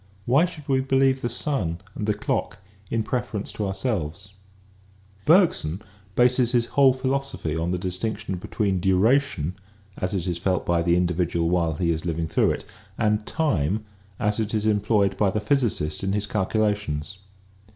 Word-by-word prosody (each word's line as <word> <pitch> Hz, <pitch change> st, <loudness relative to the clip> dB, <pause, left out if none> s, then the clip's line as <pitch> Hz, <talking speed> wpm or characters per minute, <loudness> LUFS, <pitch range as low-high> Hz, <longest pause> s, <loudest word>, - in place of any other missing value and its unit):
Why 140 Hz, +8 st, +4 dB
should 155 Hz, -5 st, -11 dB
we 135 Hz, -2 st, +2 dB
believe 135 Hz, 0 st, +2 dB
the 120 Hz, -, -1 dB
sun 110 Hz, -, -1 dB, 0.2 s
and 105 Hz, -, -4 dB
the 105 Hz, -, +2 dB
clock 105 Hz, -, -2 dB, 0.3 s
in 115 Hz, -1 st, 0 dB
preference 120 Hz, -4 st, -3 dB
to 105 Hz, -, -3 dB
ourselves? 95 Hz, -, -3 dB, 0.9 s
Bergson 155 Hz, -, +4 dB, 0.4 s
bases 125 Hz, 0 st, +3 dB
his 120 Hz, -1 st, +3 dB
whole 140 Hz, -2 st, +6 dB
philosophy 130 Hz, -, -2 dB
upon 80 Hz, +2 st, -1 dB
the 90 Hz, -, 0 dB
dis 90 Hz, 0 st, -3 dB
tinction 110 Hz, -4 st, -3 dB
between 95 Hz, 0 st, -1 dB
duration 95 Hz, -, +2 dB, 0.4 s
as 90 Hz, +2 st, -2 dB
it 90 Hz, -3 st, -2 dB
is 85 Hz, -2 st, -2 dB
felt 90 Hz, 0 st, 0 dB
by 85 Hz, -1 st, +2 dB
the 85 Hz, 0 st, +3 dB
individual 85 Hz, -1 st, +1 dB
while 85 Hz, -3 st, +1 dB
he 85 Hz, 0 st, +1 dB
is 80 Hz, -1 st, -2 dB
living 85 Hz, -2 st, -1 dB
through 80 Hz, -, +2 dB
it -, -, -2 dB, 0.3 s
and 105 Hz, -1 st, +1 dB
time 105 Hz, -, 0 dB, 0.3 s
as 105 Hz, -1 st, 0 dB
it 110 Hz, 0 st, -1 dB
is 105 Hz, 0 st, 0 dB
employed 105 Hz, -2 st, +2 dB
by 100 Hz, -1 st, +3 dB
the 105 Hz, -, -1 dB
physicist 105 Hz, -, 0 dB
in 95 Hz, 0 st, 0 dB
his 105 Hz, 0 st, 0 dB
calculations. 100 Hz, -5 st, -1 dB
105 Hz, 165 wpm, -24 LUFS, 90-120 Hz, 0.9 s, whole